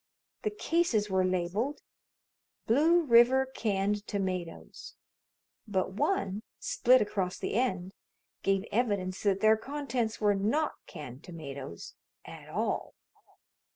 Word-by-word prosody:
The 425 Hz, -, 0 dB
cases 330 Hz, -, 0 dB
were 190 Hz, 0 st, +3 dB
labeled 185 Hz, +10 st, -1 dB, 0.8 s
"Blue 320 Hz, +9 st, +4 dB
River 250 Hz, 0 st, +6 dB
Canned 210 Hz, -5 st, -1 dB
Tomatoes," 185 Hz, -, -4 dB, 0.7 s
but 190 Hz, -2 st, 0 dB
one, 205 Hz, -, 0 dB, 0.2 s
split 255 Hz, +2 st, +4 dB
across 195 Hz, -3 st, -2 dB
the -, -, -3 dB
end, 190 Hz, -5 st, 0 dB, 0.5 s
gave 195 Hz, 0 st, +1 dB
evidence 200 Hz, -5 st, 0 dB
that 195 Hz, -2 st, +1 dB
their 220 Hz, 0 st, +5 dB
contents 260 Hz, -3 st, -3 dB
were 210 Hz, -1 st, +3 dB
not 225 Hz, +11 st, +1 dB, 0.2 s
canned 135 Hz, 0 st, -9 dB
tomatoes 140 Hz, -, -8 dB, 0.3 s
at -, -, -11 dB
all. -, -, -2 dB
210 Hz, 110 wpm, -30 LUFS, 185-255 Hz, 0.8 s, River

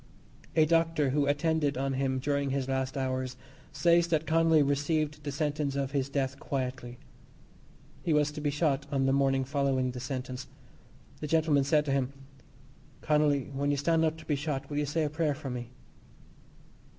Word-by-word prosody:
A 155 Hz, -1 st, +5 dB
doctor 165 Hz, -3 st, +2 dB
who 145 Hz, 0 st, +1 dB
attended 145 Hz, -1 st, +1 dB
on 135 Hz, +1 st, -1 dB
him 130 Hz, 0 st, 0 dB
during 140 Hz, +1 st, 0 dB
his 135 Hz, -1 st, -1 dB
last 130 Hz, 0 st, -2 dB
hours 130 Hz, -1 st, -2 dB, 0.3 s
says 170 Hz, +3 st, +3 dB
that 160 Hz, -2 st, 0 dB
Connolly 160 Hz, 0 st, +4 dB
received 150 Hz, +1 st, 0 dB
the 145 Hz, -, -3 dB
sentence 145 Hz, -1 st, -1 dB
of 140 Hz, -1 st, -1 dB
his 140 Hz, -2 st, -1 dB
death 140 Hz, 0 st, -2 dB
quietly. 125 Hz, -3 st, -4 dB, 1.0 s
He 170 Hz, -, -1 dB
was 150 Hz, -1 st, +3 dB
to 150 Hz, -, -7 dB
be 145 Hz, -, +1 dB
shot 145 Hz, -1 st, 0 dB
on 135 Hz, -1 st, +1 dB
the 135 Hz, -, +3 dB
morning 135 Hz, -1 st, +2 dB
following 135 Hz, -2 st, 0 dB
the 125 Hz, -, -6 dB
sentence. 130 Hz, -1 st, -5 dB, 0.7 s
This 150 Hz, -, -5 dB
gentleman 155 Hz, -3 st, +3 dB
said 150 Hz, +1 st, +3 dB
to 140 Hz, -, -1 dB
him: 135 Hz, -1 st, 0 dB, 0.9 s
"Connolly, 150 Hz, -3 st, +2 dB
when 140 Hz, +1 st, -1 dB
you 145 Hz, -, +1 dB
stand 160 Hz, +3 st, +2 dB
up 160 Hz, 0 st, +1 dB
to 160 Hz, -, -12 dB
be 150 Hz, -, 0 dB
shot, 145 Hz, -1 st, -3 dB
will 145 Hz, -, -2 dB
you 145 Hz, -, -1 dB
say 155 Hz, +3 st, 0 dB
a -, -, +1 dB
prayer 155 Hz, -2 st, 0 dB
for 135 Hz, -2 st, -6 dB
me?" 120 Hz, -1 st, -5 dB
145 Hz, 180 wpm, -29 LUFS, 135-150 Hz, 1.0 s, A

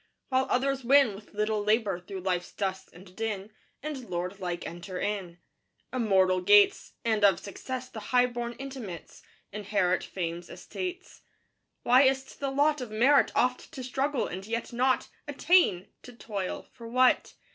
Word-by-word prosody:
While 260 Hz, 0 st, +2 dB
others 270 Hz, +1 st, 0 dB
win 270 Hz, -2 st, +5 dB
With 205 Hz, +1 st, -13 dB
little 210 Hz, 0 st, 0 dB
labor 210 Hz, -3 st, +1 dB
through 185 Hz, +1 st, -8 dB
life's 180 Hz, -1 st, -2 dB
dust 190 Hz, -1 st, -3 dB
and 180 Hz, +1 st, -15 dB
din, 215 Hz, -2 st, -3 dB, 0.3 s
And 280 Hz, -7 st, -6 dB
lord 180 Hz, +2 st, -3 dB
like 175 Hz, -2 st, -4 dB
enter 175 Hz, +2 st, -6 dB
in 190 Hz, -5 st, -3 dB, 0.6 s
Immortal 190 Hz, -6 st, +3 dB
gates; 205 Hz, +2 st, +5 dB
And, 220 Hz, -2 st, +1 dB
of 195 Hz, -3 st, +5 dB
Success 255 Hz, +5 st, -6 dB
the 225 Hz, -, -8 dB
high 250 Hz, 0 st, +5 dB
born 240 Hz, -1 st, -4 dB
intimates, 250 Hz, -10 st, -8 dB, 0.3 s
Inherit 200 Hz, -3 st, 0 dB
Fame's 170 Hz, -1 st, -5 dB
estates.... 370 Hz, 0 st, -7 dB, 0.6 s
Why 250 Hz, +2 st, +6 dB
is 265 Hz, -1 st, +3 dB
't 265 Hz, -, -16 dB
the 275 Hz, -, -1 dB
lot 290 Hz, +1 st, +2 dB
Of 245 Hz, -, -5 dB
merit 250 Hz, +7 st, +4 dB
oft 250 Hz, 0 st, 0 dB
to 265 Hz, -5 st, -6 dB
struggle 270 Hz, +1 st, -1 dB
and 190 Hz, +3 st, -6 dB
yet 230 Hz, +1 st, -3 dB
not 255 Hz, +2 st, +1 dB, 0.2 s
Attain? 290 Hz, -, +3 dB
to 250 Hz, -, -12 dB
toil 200 Hz, -5 st, -5 dB
for 230 Hz, -2 st, -10 dB
what? 255 Hz, +2 st, +3 dB
220 Hz, 155 wpm, -28 LUFS, 190-260 Hz, 0.6 s, Why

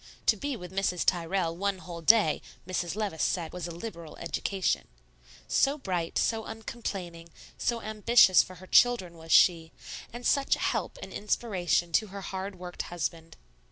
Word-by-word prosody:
To -, -, +5 dB
be 285 Hz, -1 st, -3 dB
with 180 Hz, -3 st, -9 dB
Mrs. 190 Hz, -2 st, 0 dB
Tyrrell 170 Hz, -1 st, +1 dB
one 200 Hz, +2 st, -1 dB
whole 175 Hz, -2 st, -8 dB
day, 205 Hz, -3 st, +5 dB, 0.3 s
Mrs. 180 Hz, -1 st, -2 dB
Levice 205 Hz, -7 st, -2 dB
said 170 Hz, -3 st, -1 dB
was 180 Hz, -1 st, -4 dB
a -, -, -6 dB
liberal 170 Hz, -3 st, -8 dB
education, 170 Hz, -, -1 dB, 0.6 s
so 280 Hz, +2 st, +2 dB
bright, 180 Hz, -, -2 dB
so 225 Hz, -1 st, +1 dB
uncomplaining, 195 Hz, -7 st, -6 dB, 0.3 s
so 235 Hz, -1 st, -1 dB
ambitious 215 Hz, -2 st, +5 dB
for 185 Hz, -, -9 dB
her 185 Hz, +2 st, -13 dB
children 190 Hz, -5 st, +4 dB
was 165 Hz, 0 st, -10 dB
she, 165 Hz, -2 st, +5 dB, 0.4 s
and 240 Hz, +1 st, -8 dB
such 280 Hz, -1 st, +3 dB
a -, -, -10 dB
help -, -, -1 dB
and -, -, -9 dB
inspiration 185 Hz, -5 st, 0 dB
to 215 Hz, +6 st, +2 dB
her 200 Hz, 0 st, -8 dB
hard 190 Hz, 0 st, -5 dB
worked 180 Hz, 0 st, -6 dB
husband. 165 Hz, -1 st, -4 dB
185 Hz, 160 wpm, -29 LUFS, 170-215 Hz, 0.6 s, To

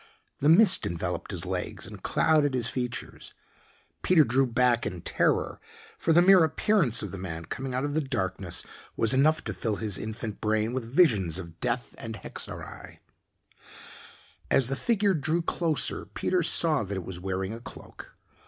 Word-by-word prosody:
The 145 Hz, -, +3 dB
mist 185 Hz, +3 st, +5 dB
enveloped 85 Hz, +1 st, -4 dB
his -, -, -4 dB
legs -, -, -4 dB
and -, -, -10 dB
clouded 150 Hz, -4 st, +2 dB
his 120 Hz, -3 st, -1 dB
features. 125 Hz, -2 st, -5 dB, 0.7 s
Peter 175 Hz, -4 st, +5 dB
drew 130 Hz, +2 st, +2 dB
back 120 Hz, 0 st, +2 dB
in 90 Hz, -2 st, -6 dB
terror, -, -, 0 dB, 0.4 s
for 165 Hz, -, +1 dB
the 170 Hz, +2 st, +6 dB
mere 190 Hz, -2 st, +7 dB
appearance 160 Hz, -, +2 dB
of 100 Hz, -, -5 dB
the 95 Hz, -, -6 dB
man 85 Hz, -3 st, -6 dB
coming 130 Hz, +7 st, -5 dB
out 130 Hz, -, -1 dB
of 145 Hz, -, -3 dB
the 155 Hz, -, +1 dB
darkness 95 Hz, -, -2 dB, 0.3 s
was 115 Hz, +2 st, +3 dB
enough 155 Hz, +4 st, +3 dB
to -, -, -4 dB
fill 110 Hz, -3 st, -2 dB
his 105 Hz, -2 st, -2 dB
infant 110 Hz, 0 st, -6 dB
brain 110 Hz, +1 st, 0 dB
with 120 Hz, -3 st, -4 dB
visions 105 Hz, -, +3 dB
of 85 Hz, -2 st, -9 dB
death -, -, -2 dB
and -, -, -6 dB
hexerei. -, -, -9 dB, 1.5 s
As 130 Hz, -2 st, +3 dB
the 135 Hz, -, 0 dB
figure 205 Hz, -, +2 dB
drew 160 Hz, +2 st, 0 dB
closer 165 Hz, -3 st, -1 dB
Peter 185 Hz, -1 st, -1 dB
saw 160 Hz, -2 st, +2 dB
that 100 Hz, -2 st, -4 dB
it 90 Hz, -, -5 dB
was 90 Hz, -2 st, -6 dB
wearing 95 Hz, +2 st, -3 dB
a 115 Hz, -, -7 dB
cloak. -, -, -11 dB
125 Hz, 170 wpm, -27 LUFS, 100-155 Hz, 1.5 s, mere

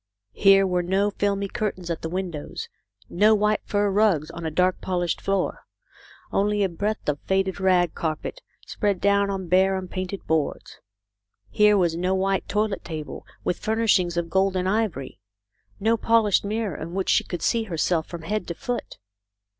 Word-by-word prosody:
Here 195 Hz, -1 st, +5 dB
were 180 Hz, -1 st, +1 dB
no 195 Hz, +3 st, +1 dB
filmy 200 Hz, 0 st, -1 dB
curtains 185 Hz, -4 st, -3 dB
at 165 Hz, -, -3 dB
the 165 Hz, -, -4 dB
windows, 175 Hz, -4 st, -5 dB, 0.4 s
no 210 Hz, +5 st, +4 dB
white 210 Hz, 0 st, +1 dB
fur 205 Hz, -1 st, +1 dB
rugs 190 Hz, -7 st, +2 dB
on 170 Hz, -1 st, -5 dB
a -, -, 0 dB
dark 180 Hz, +3 st, +1 dB
polished 175 Hz, -2 st, -1 dB
floor. 195 Hz, -1 st, -1 dB, 0.6 s
Only 205 Hz, +1 st, +1 dB
a 195 Hz, -, +1 dB
breadth 205 Hz, +5 st, -3 dB
of 145 Hz, -1 st, 0 dB
faded 190 Hz, 0 st, 0 dB
rag 180 Hz, -3 st, +3 dB
carpet, 160 Hz, -, -4 dB, 0.2 s
spread 200 Hz, -4 st, -1 dB
down 200 Hz, 0 st, +2 dB
on 190 Hz, -2 st, -3 dB
bare 190 Hz, +2 st, +3 dB
unpainted 185 Hz, +1 st, -5 dB
boards. 160 Hz, -3 st, -2 dB, 0.7 s
Here 210 Hz, -1 st, +5 dB
was 170 Hz, -3 st, +2 dB
no 180 Hz, +2 st, 0 dB
white 195 Hz, 0 st, 0 dB
toilet 210 Hz, -1 st, -1 dB
table 155 Hz, -3 st, -7 dB, 0.2 s
with 175 Hz, -, -1 dB
furnishings 210 Hz, -6 st, +1 dB
of 170 Hz, -1 st, -2 dB
gold 190 Hz, 0 st, +2 dB
and 185 Hz, 0 st, 0 dB
ivory; 195 Hz, -, -1 dB, 0.6 s
no 225 Hz, +3 st, +2 dB
polished 225 Hz, -3 st, +3 dB
mirror 210 Hz, -3 st, -2 dB
in 165 Hz, +4 st, -6 dB
which 195 Hz, -1 st, -1 dB
she -, -, +4 dB
could 175 Hz, -, -6 dB
see 230 Hz, -1 st, +1 dB
herself 165 Hz, -3 st, 0 dB
from 170 Hz, -2 st, -8 dB
head 210 Hz, +2 st, -2 dB
to 170 Hz, -, -4 dB
foot. 245 Hz, +6 st, -4 dB
190 Hz, 170 wpm, -24 LUFS, 175-205 Hz, 0.7 s, Here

